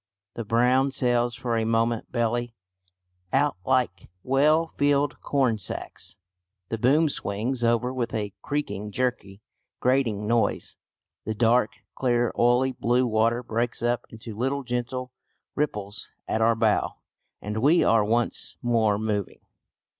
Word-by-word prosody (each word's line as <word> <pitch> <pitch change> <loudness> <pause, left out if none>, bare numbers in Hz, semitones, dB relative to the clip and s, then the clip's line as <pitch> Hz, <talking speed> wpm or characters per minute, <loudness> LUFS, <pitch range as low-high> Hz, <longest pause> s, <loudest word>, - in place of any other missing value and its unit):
The 115 - -4
brown 125 +5 +3
sails 120 -2 +1
for 120 -2 -2
a 115 - +1
moment 115 0 0
belly 120 0 -1 0.8
out 145 +2 +2
like 130 +1 0
well 150 +5 +3
filled 145 -2 0
corn 130 -6 +1
sacks. 95 - -6 0.5
The 115 - -3
boom 145 +7 +4
swings 120 0 -2
over 120 +2 +2
with 125 -2 -2
a 105 -3 -3
creaking, 140 -8 -3
jerky, 110 -5 -3 0.4
grating 125 -5 +1
noise. 115 +1 0 0.5
The 110 - -2
dark, 115 +1 +2
clear, 120 -2 +1
oily 125 +2 +3
blue 125 0 +1
water 115 +1 +1
breaks 115 +1 -2
up 120 0 0
into 110 -1 -9
little 135 +5 -1
gentle 125 +1 -3 0.4
ripples 105 -9 -3 0.2
at 110 - 0
our 115 +1 +4
bow, 110 -2 +1 0.4
and 105 +1 -5
we 150 +8 +4
are 115 -2 +4
once 115 +3 0
more 115 -4 +2
moving. 105 -2 -3
120 Hz, 130 wpm, -26 LUFS, 110-130 Hz, 0.8 s, boom